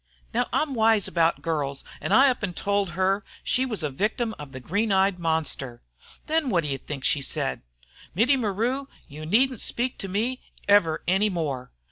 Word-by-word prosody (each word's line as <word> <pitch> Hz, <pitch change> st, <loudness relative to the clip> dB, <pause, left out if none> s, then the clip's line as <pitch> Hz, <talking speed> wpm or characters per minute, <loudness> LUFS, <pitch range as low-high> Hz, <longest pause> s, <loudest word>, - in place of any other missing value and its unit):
Now, -, -, +1 dB
I'm 305 Hz, -3 st, 0 dB
wise 220 Hz, -3 st, +3 dB
'bout 165 Hz, -1 st, +1 dB
girls, 145 Hz, -4 st, -2 dB, 0.2 s
an' -, -, -3 dB
I 270 Hz, +6 st, +7 dB
up 250 Hz, -, -5 dB
an' 185 Hz, -4 st, -1 dB
tol' 200 Hz, +2 st, 0 dB
her 190 Hz, +3 st, 0 dB, 0.2 s
she 260 Hz, +1 st, +1 dB
was 215 Hz, -9 st, -3 dB
a 150 Hz, -, -1 dB
victim 220 Hz, -, -1 dB
of 145 Hz, -2 st, -8 dB
the 130 Hz, -, -7 dB
green 200 Hz, -, -1 dB
eyed 190 Hz, -1 st, +3 dB
monster. 160 Hz, -7 st, -1 dB, 0.4 s
Then 315 Hz, -3 st, +1 dB
wot 170 Hz, -6 st, +2 dB
you 140 Hz, -2 st, -2 dB
think 140 Hz, -3 st, -7 dB
she 145 Hz, -, +2 dB
said? -, -, -1 dB, 0.5 s
'Mittie 240 Hz, +9 st, +4 dB
Maru, 245 Hz, +4 st, -1 dB, 0.2 s
you 155 Hz, +2 st, -8 dB
needn't 255 Hz, +6 st, +3 dB
speak 245 Hz, +1 st, -1 dB
to 195 Hz, -, -4 dB
me 225 Hz, +7 st, -1 dB, 0.3 s
ever 200 Hz, -6 st, +4 dB
any 195 Hz, +4 st, +3 dB
more.' 145 Hz, -9 st, -3 dB
195 Hz, 180 wpm, -25 LUFS, 160-230 Hz, 0.5 s, I